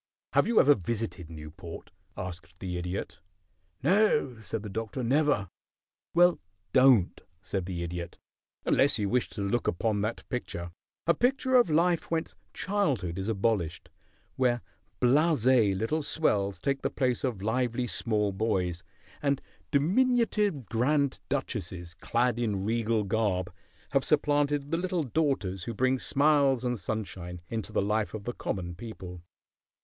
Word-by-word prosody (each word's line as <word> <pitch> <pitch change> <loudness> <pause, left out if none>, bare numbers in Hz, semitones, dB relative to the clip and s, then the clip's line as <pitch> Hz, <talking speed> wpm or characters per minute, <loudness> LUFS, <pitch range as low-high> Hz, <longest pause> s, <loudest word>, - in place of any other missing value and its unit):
"Have - - +4
you 230 -1 +4
ever 145 - +7
visited 105 - -4
Newport?" 80 +2 -9 0.3
asked 90 -2 -7
the 90 -1 -4
Idiot. 90 +2 -4 0.6
"No," 190 - +3
said 110 0 -4
the - - -5
Doctor, 115 +5 -4
"never." 135 -4 +2 0.7
"Well, 175 0 +5 0.3
don't," 130 -8 +5 0.2
said 95 -2 -3
the 85 -2 -3
Idiot, 85 0 -5 0.5
"unless 135 -3 +4
you 105 -2 -1
wish 125 +2 +1
to 100 - -5
look 115 +4 0
upon 105 +3 0
that 110 +3 -3
picture 85 -8 -4 0.3
a 170 - +5
picture 260 - +1
of 245 -8 +6
life 170 +2 +2
whence 165 -1 -1 0.2
childhood 135 - -1
is 95 +3 -2
abolished; 100 -6 -1 0.5
where 120 -2 +2 0.4
blasé 125 - +4
little 150 +10 0
swells 100 -11 +1
take 140 -1 -1
the - - 0
place 125 -3 0
of 115 -8 -2
lively 125 +2 0
small 105 -4 0
boys, 95 -4 -1 0.4
and 140 -2 +1 0.3
diminutive 205 - +2
grand 140 +5 +1
duchesses, 95 -11 -3
clad 120 +6 0
in 105 -5 -1
regal 115 0 +1
garb, 100 -4 0 0.4
have 135 -1 +2
supplanted 145 -1 +2
the 165 - +2
little 180 -1 -1
daughters 125 - -1
who 115 - -4
bring 130 +3 +2
smiles 135 +5 +3
and 125 -2 -1
sunshine 90 -3 -5
into 110 -2 -4
the - - +1
life 105 +1 0
of 105 - -6
the 120 - -3
common 90 -6 -4
people. 90 -3 -8
115 Hz, 140 wpm, -29 LUFS, 95-140 Hz, 0.7 s, ever